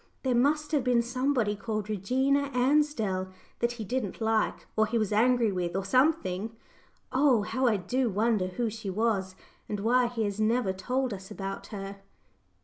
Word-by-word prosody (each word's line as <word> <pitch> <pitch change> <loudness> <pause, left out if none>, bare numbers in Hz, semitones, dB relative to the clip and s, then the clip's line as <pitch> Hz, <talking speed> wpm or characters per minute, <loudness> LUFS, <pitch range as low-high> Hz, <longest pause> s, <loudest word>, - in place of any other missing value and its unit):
There 260 -2 +1
must 295 +5 +2
have 295 -4 +2
been 245 -2 +3
somebody 250 -3 0
called 215 0 -3
'Regina 265 +7 +1
Ansdell' 250 -8 +1 0.3
that 235 0 +1
he 225 -3 -6
didn't 235 -3 -3
like, 220 -1 0
or 220 0 +3
he 235 +2 0
was 215 -2 0
angry 235 0 +3
with, 180 -2 -2
or 195 0 -1
something. 225 - +1 0.6
Oh! 260 -5 +3
how 260 +4 0
I 220 -3 +3
do 245 +7 0
wonder 210 -1 +1
who 230 +6 -2
she 215 -2 -6
was, 195 -2 0 0.3
and 210 -1 -3
why 245 +3 +3
he 235 -2 -2
has 205 0 -3
never 220 -2 +1
told 250 +6 -1
us 190 -1 -9
about 195 0 -6
her?" 200 -1 -7
225 Hz, 170 wpm, -28 LUFS, 200-255 Hz, 0.6 s, been